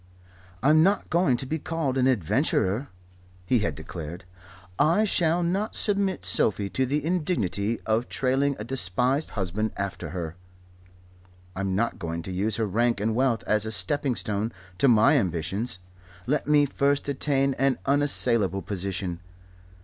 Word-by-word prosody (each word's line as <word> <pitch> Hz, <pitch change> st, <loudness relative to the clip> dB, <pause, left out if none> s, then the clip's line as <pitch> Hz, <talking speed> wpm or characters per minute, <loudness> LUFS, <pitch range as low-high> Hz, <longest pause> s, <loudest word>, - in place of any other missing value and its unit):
"I'm 155 Hz, +3 st, +5 dB
not 195 Hz, +5 st, +2 dB
going 165 Hz, -7 st, +3 dB
to 130 Hz, -, -4 dB
be 160 Hz, +4 st, -2 dB
called 155 Hz, -4 st, -2 dB
an 130 Hz, -1 st, +2 dB
adventurer," 105 Hz, -, +1 dB, 0.6 s
he 120 Hz, +6 st, +2 dB
had 85 Hz, -8 st, -1 dB
declared. 80 Hz, +3 st, -8 dB, 0.6 s
"I 165 Hz, +8 st, +4 dB
shall 175 Hz, -4 st, +2 dB
not 195 Hz, +6 st, -1 dB
submit 200 Hz, -3 st, 0 dB
Sophie 100 Hz, -1 st, +1 dB
to 130 Hz, -1 st, 0 dB
the 145 Hz, +2 st, -1 dB
indignity 115 Hz, -, -1 dB
of 110 Hz, +2 st, -1 dB
trailing 135 Hz, +2 st, +1 dB
a 105 Hz, -, -5 dB
despised 125 Hz, -, 0 dB
husband 100 Hz, +3 st, -2 dB
after 100 Hz, -1 st, -4 dB
her. 85 Hz, -2 st, -5 dB, 1.2 s
I'm 95 Hz, -1 st, -2 dB
not 115 Hz, +2 st, -1 dB
going 85 Hz, -2 st, -4 dB
to 95 Hz, -, -6 dB
use 100 Hz, +4 st, -1 dB
her 115 Hz, -, 0 dB
rank 115 Hz, +2 st, +1 dB
and 110 Hz, +2 st, 0 dB
wealth 125 Hz, -1 st, +1 dB
as 105 Hz, -1 st, +2 dB
a -, -, -3 dB
stepping 140 Hz, +2 st, 0 dB
stone 105 Hz, +1 st, -2 dB, 0.3 s
to 140 Hz, -, +4 dB
my 115 Hz, -3 st, +5 dB
ambitions. 90 Hz, +4 st, -2 dB, 0.5 s
Let 145 Hz, +5 st, -1 dB
me 150 Hz, -1 st, +5 dB
first 140 Hz, +1 st, 0 dB
attain 140 Hz, -1 st, +1 dB
an 135 Hz, 0 st, +2 dB
unassailable 120 Hz, -, +2 dB
position. 95 Hz, -2 st, -3 dB
120 Hz, 150 wpm, -26 LUFS, 100-145 Hz, 1.2 s, I'm